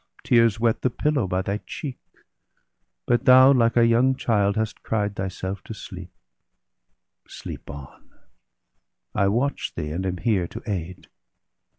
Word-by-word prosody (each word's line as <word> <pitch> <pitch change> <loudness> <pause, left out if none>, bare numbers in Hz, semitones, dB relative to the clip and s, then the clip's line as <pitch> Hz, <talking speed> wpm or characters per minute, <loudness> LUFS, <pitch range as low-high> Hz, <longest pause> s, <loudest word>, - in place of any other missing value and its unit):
Tears 115 -2 +3
wet 115 -1 +1
the 130 - +2
pillow 140 -3 0
by 90 +1 -1
thy 100 +2 -2
cheek; 135 -5 -6 1.1
but 120 +1 +1
thou, 130 +1 +8
Like 115 -2 +2
a 120 - +6
young 120 +3 +3
child, 100 -5 +1
hast 110 -1 -3
cried 105 -2 -2
thyself 95 0 -4
to 110 - -7
sleep. 90 -2 -9 1.2
Sleep - - -9
on; 70 -1 -11 1.0
I 100 - +2
watch 125 +8 -1
thee, 75 -2 -4
and 90 +4 -3
am 90 -1 -2
here 100 -5 0
to - - -9
aid. 90 -4 -5
105 Hz, 145 wpm, -24 LUFS, 95-120 Hz, 1.2 s, thou